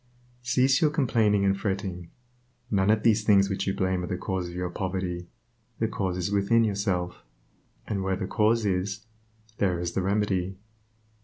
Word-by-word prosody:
Cease 130 +2 +2
your 155 - +5
complaining 115 -9 +2
and 95 0 +3
fretting; 95 -4 -3 0.6
none 95 -1 +2
of 110 0 +3
these 110 -1 +3
things 100 -2 +4
which 95 - -2
you 95 - +1
blame 95 -1 0
are - - -4
the 90 - -2
cause 95 -2 -3
of 85 - -9
your 90 -1 -3
poverty; 90 -2 -3 0.5
the 110 - 0
cause 95 -4 -2
is 90 +2 -2
within 100 +3 +3
yourself, 100 -4 -1 0.6
and 100 -2 -2
where 95 0 0
the 95 - -3
cause 110 +2 +2
is, 100 +2 -1 0.5
there 90 -4 +1
is 85 0 -2
the 95 - -1
remedy. 95 -1 0
95 Hz, 170 wpm, -27 LUFS, 90-105 Hz, 0.6 s, your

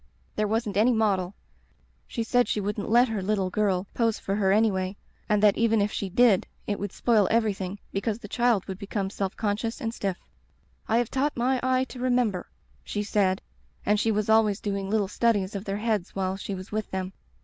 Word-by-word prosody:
There 215 - +1
wasn't 215 -2 -1
any 235 +4 +4
model. 200 -4 +1 0.7
She 230 - -3
said 245 +2 +2
she - - 0
wouldn't 205 0 -3
let 240 +3 +5
her 215 -3 -2
little 190 -1 0
girl 195 -3 +1
pose 230 -2 +1
for 195 - -3
her 195 -2 +2
any 215 +2 +4
way, 190 +1 -3 0.3
and 210 -1 +2
that 205 -1 +5
even 225 -1 +3
if 205 +1 +1
she 200 - -3
did 220 -1 +4 0.2
it 205 - -2
would 205 -1 -3
spoil 220 -5 +3
everything 205 -4 0
because 205 +2 -1
the 230 - -10
child 235 -3 +2
would 190 -1 -6
become 200 -1 -3
self 195 -2 -3
conscious 215 +2 -1
and 225 0 -3
stiff. 195 -5 -2 0.7
"*I 225 - +2
have 240 -1 0
taught 275 +1 0
my 255 +2 +1
eye 255 0 +2
to 260 -1 -9
remember,' 245 -7 0 0.3
she 205 - -3
said, 195 -3 +1 0.4
and 210 +1 +3
she 225 - +2
was 210 -1 0
always 220 -2 +4
doing 200 -1 -3
little 210 -2 +1
studies 205 -2 +1
of 200 0 -5
their 195 0 -2
heads 210 -4 -1
while 190 -1 -1
she 195 0 -5
was 185 0 -9
with 215 0 -2
them. 190 0 -4
210 Hz, 205 wpm, -26 LUFS, 195-225 Hz, 0.7 s, let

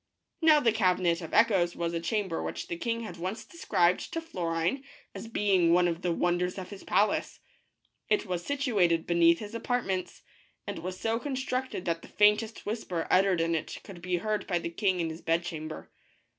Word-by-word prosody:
Now 310 -2 +6
the 235 -5 +3
Cabinet 180 -5 +2
of 165 - -7
Echoes 190 -6 +3
was 170 0 -2
a 170 - -1
chamber 185 0 -1
which - - -5
the 170 - -2
king 230 +6 -2
had 210 -6 -7
once 185 +6 -4
described 180 - +1
to 330 - -1
Florine 175 - -2 0.3
as - - -7
being 195 -6 +3
one 175 0 +4
of 170 0 -2
the 180 - 0
wonders 175 +2 0
of 185 0 -7
his 200 - -9
palace. 205 0 +1 0.7
It 420 - +2
was 180 -3 -3
situated 205 - +1
beneath 170 -1 +4
his 210 +2 -8
apartments, 230 -6 -2 0.4
and - - -5
was 185 +1 -6
so 225 +1 0
constructed 260 -4 -3
that 165 -1 -1
the - - -12
faintest 210 +2 +2
whisper 205 -6 -3
uttered 185 -2 +4
in 165 0 +1
it 160 - -3
could 185 -4 -11
be 180 0 -1
heard 215 +3 -2
by 175 - +1
the 170 0 -4
king 190 0 0
in 165 -1 -1
his 160 - -9
bedchamber. 165 -2 -3
185 Hz, 185 wpm, -29 LUFS, 170-220 Hz, 0.7 s, Now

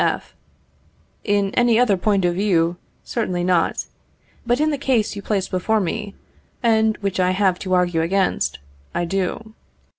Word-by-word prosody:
F. - - -2 0.9
In 205 -2 +1
any 240 -2 +3
other 235 -5 +4
point 195 0 +1
of 175 - +2
view, 175 -3 +1 0.3
certainly 180 -7 -2
not; 175 -2 +1 0.6
but 240 +2 +2
in 310 +1 +2
the 290 - -2
case 250 -7 +1
you 200 - -6
place 200 -2 -1
before 215 +4 0
me, 200 +2 -3 0.5
and 220 -1 +3
which 195 -2 -2
I 180 0 +3
have 185 -1 +1
to 185 -2 0
argue 175 -2 +2
against, 185 - 0 0.4
I 175 - 0
do. 195 +5 -3
195 Hz, 155 wpm, -21 LUFS, 180-220 Hz, 0.9 s, other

